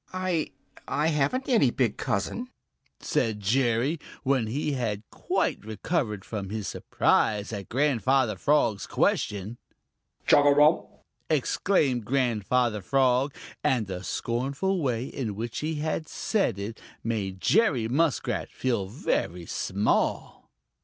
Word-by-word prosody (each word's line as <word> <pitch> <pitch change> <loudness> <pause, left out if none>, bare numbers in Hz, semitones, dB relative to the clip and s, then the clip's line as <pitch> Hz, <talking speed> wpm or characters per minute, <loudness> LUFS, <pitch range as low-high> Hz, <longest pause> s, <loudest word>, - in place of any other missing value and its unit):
"I 185 -4 -1 0.4
I 150 +3 +1
haven't 165 - 0
any 225 - +4
big 120 -4 0
cousin," 235 - -2 0.5
said 110 -3 0
Jerry, 120 - +1 0.2
when 130 -5 +1
he 145 +6 -1
had 115 -6 -2
quite - - -1
recovered 110 - -2
from 100 -4 -5
his 105 -1 -4
surprise 105 +1 +1
at 100 -2 -6
Grandfather 130 -3 +2
Frog's 110 -3 +1
question. 105 +3 0 0.7
"Chugarum!" 145 +2 +5 0.4
exclaimed 145 - +1
Grandfather 120 -2 +1
Frog, 130 +5 +2 0.3
and 120 -5 +2
the 95 -1 -6
scornful 140 - -1
way 125 -4 0
in 115 -7 -4
which 115 +2 -4
he 155 0 -2 0.3
said 195 - 0
it 105 +3 -6 0.2
made 100 -5 -2
Jerry 130 - +3
Muskrat 145 +4 0
feel 115 -7 -1
very 90 - -2
small. 100 +5 -1
125 Hz, 110 wpm, -27 LUFS, 105-145 Hz, 0.7 s, Chugarum